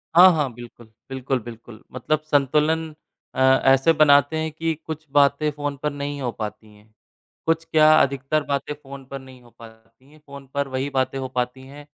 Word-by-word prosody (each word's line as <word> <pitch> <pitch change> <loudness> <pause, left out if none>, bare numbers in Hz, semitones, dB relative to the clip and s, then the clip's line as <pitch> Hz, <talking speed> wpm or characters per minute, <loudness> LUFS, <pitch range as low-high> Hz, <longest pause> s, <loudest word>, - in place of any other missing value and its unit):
हाँ, 180 +2 +9
हाँ। 150 -5 -1
बिल्कुल, 120 0 -13 0.2
बिल्कुल, 130 0 -2
बिल्कुल। 115 -1 -12
मतलब 135 +4 -1
संतुलन 155 +3 +1 0.4
अ, - - -4 0.3
ऐसे 135 +4 +5
बनाते 145 0 +4
हैं 160 0 -2
कि 165 +1 -2
कुछ 160 0 -7
बातें 145 +1 +3
फ़ोन 145 -1 -4
पर 150 - 0
नहीं 145 0 -5
हो 125 -2 -2
पाती 110 -1 -7
हैं, 105 +1 -23 0.5
कुछ 165 0 +1
क्या 155 -1 +4
अधिकतर 140 +2 0
बातें 140 +1 -3
फ़ोन 140 -2 -12
पर 135 - -5
नहीं 130 -1 -15
हो 120 - -19
पाती 115 +3 -17
हैं, 155 - -19
फ़ोन 140 -1 -11
पर 140 -1 -1
वही 130 +1 -3
बातें 135 -1 -1
हो 130 - -4
पाती 125 +1 -2
हैं 145 +2 -12
140 Hz, 185 wpm, -22 LUFS, 130-150 Hz, 0.5 s, हाँ